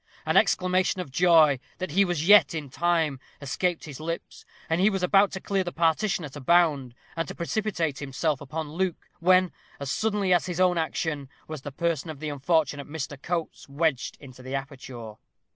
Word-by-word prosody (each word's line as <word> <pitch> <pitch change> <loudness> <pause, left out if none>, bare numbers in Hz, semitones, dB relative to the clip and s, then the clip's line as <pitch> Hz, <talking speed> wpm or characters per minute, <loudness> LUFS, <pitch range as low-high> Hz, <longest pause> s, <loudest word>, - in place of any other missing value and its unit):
An - - 0
exclamation 185 +1 +2
of 180 -7 -5
joy, 160 -3 +5 0.2
that 185 -4 -4
he 195 +6 +4
was 175 -3 -2
yet 195 -7 +7
in 145 -4 -5
time, 160 -3 +1 0.2
escaped 170 +5 -1
his 145 -3 -9
lips; 165 +2 -6 0.2
and 165 +2 +1
he 200 - +5
was 195 -3 -2
about 195 +2 +4
to 190 - -4
clear 195 0 -1
the 175 - -4
partition 170 +3 +1
at 140 - -10
a 145 - -7
bound, 145 -5 +2 0.2
and 165 -2 -2
to - - -7
precipitate 170 -5 -2
himself 140 +1 -2
upon 150 +2 -5
Luke, 185 0 -2
when, 185 +1 +4 0.3
as 140 -1 -3
suddenly 205 -4 +1
as 175 - +2
his 180 -1 -4
own 180 -2 +3
action, 155 -3 -2 0.2
was 155 -3 -6
the 145 - -7
person 165 +1 -2
of 155 -3 -7
the 155 0 -4
unfortunate 145 0 0
Mr. 145 -2 -5
Coates 170 -4 -4
wedged 145 -2 -1
into 130 -3 -13
the 130 +2 -5
aperture. 130 -5 -7
160 Hz, 190 wpm, -26 LUFS, 145-180 Hz, 0.3 s, yet